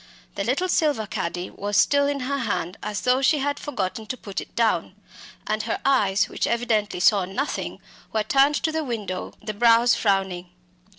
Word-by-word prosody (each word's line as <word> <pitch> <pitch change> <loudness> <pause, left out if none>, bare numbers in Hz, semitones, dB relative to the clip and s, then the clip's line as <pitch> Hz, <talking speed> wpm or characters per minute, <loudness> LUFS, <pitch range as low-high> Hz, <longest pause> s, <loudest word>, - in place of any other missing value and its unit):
The 200 - -3
little 275 - 0
silver 295 -10 +1
caddy 175 -2 -4
was 205 +1 -2
still 285 0 +4
in 285 -1 -1
her 280 +2 -2
hand 185 -6 -2
as 210 -1 -3
though 255 +1 +2
she 300 +3 +4
had 285 +1 -1
forgotten 215 -5 -4
to 255 - -4
put 200 -4 -5
it - - -13
down; 215 -5 +1 0.5
and 215 +1 -1
her - - -2
eyes, 205 -8 +3
which - - -2
evidently 225 -5 0
saw 200 +1 +4
nothing, 225 +11 -3 0.3
were 220 -1 0
turned 275 +6 +3
to 320 - +1
the 320 0 -1
window, 210 -8 -4
the 215 0 -4
brows 235 +2 +5
frowning. 190 -4 0
220 Hz, 180 wpm, -24 LUFS, 200-275 Hz, 0.5 s, brows